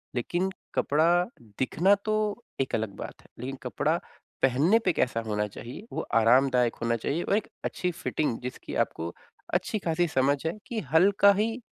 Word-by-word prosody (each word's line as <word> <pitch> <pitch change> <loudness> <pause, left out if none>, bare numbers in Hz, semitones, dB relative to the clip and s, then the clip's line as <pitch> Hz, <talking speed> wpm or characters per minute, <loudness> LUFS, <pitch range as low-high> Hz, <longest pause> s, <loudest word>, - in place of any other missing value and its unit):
लेकिन 175 +10 0 0.3
कपड़ा 170 +4 +3 0.4
दिखना 170 +9 +3
तो 215 +1 0 0.2
एक 130 - -1
अलग 110 -1 -1
बात - - -8
है। - - -21
लेकिन 130 +3 -4
कपड़ा - - 0 0.4
पहनने 145 - +4
पे 180 - +3
कैसा 120 -6 +1
होना 105 -1 0
चाहिए, 120 - -9
वो - - -1
आरामदायक 125 +1 +4
होना 115 0 +1
चाहिए 140 +9 -2
और 200 - +2
एक 220 - -3 0.2
अच्छी 180 - -1
फ़िटिंग 155 -6 -2
जिसकी 125 +1 -6
आपको 85 +1 -7 0.4
अच्छी-खासी 175 -4 0
समझ 140 -1 +2
है 160 - 0
कि 235 - -2
हल्का 200 +4 +6
ही 225 +4 0
155 Hz, 160 wpm, -28 LUFS, 125-190 Hz, 0.4 s, हल्का